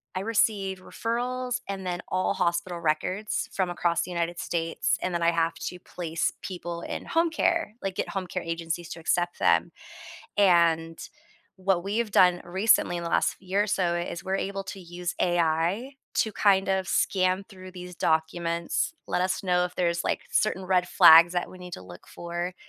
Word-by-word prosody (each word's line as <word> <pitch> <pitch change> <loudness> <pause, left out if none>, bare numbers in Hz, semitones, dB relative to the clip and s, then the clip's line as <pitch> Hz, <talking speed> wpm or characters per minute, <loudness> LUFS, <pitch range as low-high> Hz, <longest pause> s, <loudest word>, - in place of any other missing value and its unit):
I 185 - -1
receive 200 -3 0
referrals 245 +4 -3
and 195 -1 -4
then 175 -1 -3
all 185 +1 +1
hospital 175 -1 -1
records 185 +7 -1
from 190 -2 0
across 170 -1 0
the 180 - -5
United 170 0 -2
States, 165 -1 -1
and 185 - -1
then 170 - -1
I 170 - +4
have 165 -1 +1
to 180 - -6
place 170 -2 -3
people 175 -2 -6
in - - -5
home 330 +1 +2
care, 330 -7 0
like 195 -1 -2
get - - -2
home 195 -2 -3
care 180 +1 -3
agencies 165 0 -4
to 165 - -7
accept 175 +1 0
them. 85 -1 +3 0.7
And, 170 -4 +3 0.6
what 190 -2 0
we've 215 +3 -1
done 180 -3 +4
recently 185 0 +2
in 170 - -5
the 170 - -3
last - - +1
year 190 +2 0
or - - -4
so 180 -4 +1
is 175 0 -4
we're 190 +1 -1
able 195 0 -3
to 195 +1 -8
use 175 0 -5
AI 175 - +1 0.2
to 220 - +1
kind 195 -1 +3
of 190 -1 0
scan 185 0 +1
through 185 -3 -11
these 180 -1 -9
documents, 165 - 0 0.2
let - - 0
us 185 +1 -1
know 180 -1 +2
if 180 0 -4
there's, 170 -1 0
like, - - -1
certain 190 -3 +1
red 180 -1 +2
flags 165 +2 +8
that 175 - -1
we 185 - -12
need 180 -1 -9
to - - -7
look 90 -1 -13
for 175 +1 -5
180 Hz, 185 wpm, -27 LUFS, 170-195 Hz, 0.7 s, flags